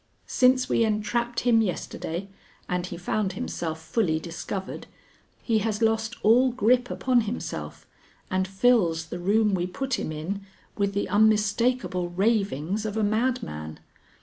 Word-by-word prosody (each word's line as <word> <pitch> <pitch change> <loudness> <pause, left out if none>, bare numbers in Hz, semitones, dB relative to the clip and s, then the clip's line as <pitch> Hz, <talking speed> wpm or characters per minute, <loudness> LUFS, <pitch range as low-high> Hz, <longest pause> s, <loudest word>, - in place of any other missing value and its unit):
"Since 255 0 +3
we 230 - +2
entrapped 235 +3 0
him 235 -2 +4
yesterday 180 -2 -3 0.4
and 180 0 -2
he - - -6
found 190 +2 -1
himself 160 -3 -4
fully 160 0 0
discovered, 180 +3 -6 0.6
he 225 -2 +2
has 215 0 -1
lost 225 +1 +1
all 250 +4 +5
grip 245 +1 +2
upon 250 -2 +2
himself 220 +2 -5 0.5
and 185 0 +1
fills 190 -5 +2
the 165 - -6
room 210 +3 +2
we 180 -1 0
put 265 +7 -2
him - - -3
in 165 +6 -4 0.3
with 200 -1 -1
the 200 - 0
unmistakable 210 -1 +2
ravings 195 - 0
of 215 0 -3
a 220 - +1
madman. 215 - -1
210 Hz, 140 wpm, -26 LUFS, 180-235 Hz, 0.6 s, all